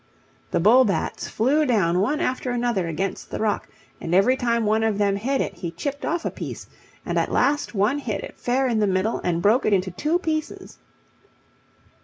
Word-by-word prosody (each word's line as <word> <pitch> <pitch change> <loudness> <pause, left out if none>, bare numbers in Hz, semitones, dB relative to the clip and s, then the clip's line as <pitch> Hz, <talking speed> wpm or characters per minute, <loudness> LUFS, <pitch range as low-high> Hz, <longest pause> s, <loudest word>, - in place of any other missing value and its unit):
The - - 0
bull 230 +9 +6
bats 200 -6 -2
flew 275 +8 +2
down 195 - +2
one 285 +11 +1
after 255 -3 -1
another 240 -7 0
against 185 +4 -3
the - - -4
rock, 215 -1 -1 0.3
and 165 +1 -1
every 230 +7 +4
time 235 -3 0
one 215 +1 +2
of 220 -2 +1
them 200 -1 +2
hit 265 +7 -1
it - - -3
he 170 - -5
chipped 285 - -5
off 335 +1 -2
a - - -1
piece, - - -7 0.4
and - - 0
at - - -1
last 290 -4 +1
one 215 +9 +2
hit 230 -7 -4
it - - -9
fair 260 +2 +1
in 230 -3 +1
the 210 - +2
middle 190 +4 0
and 170 -1 -1
broke 225 +6 +4
it 210 - +2
into 185 -1 +1
two 300 - 0
pieces. 315 -3 -4
225 Hz, 200 wpm, -23 LUFS, 195-265 Hz, 0.4 s, bull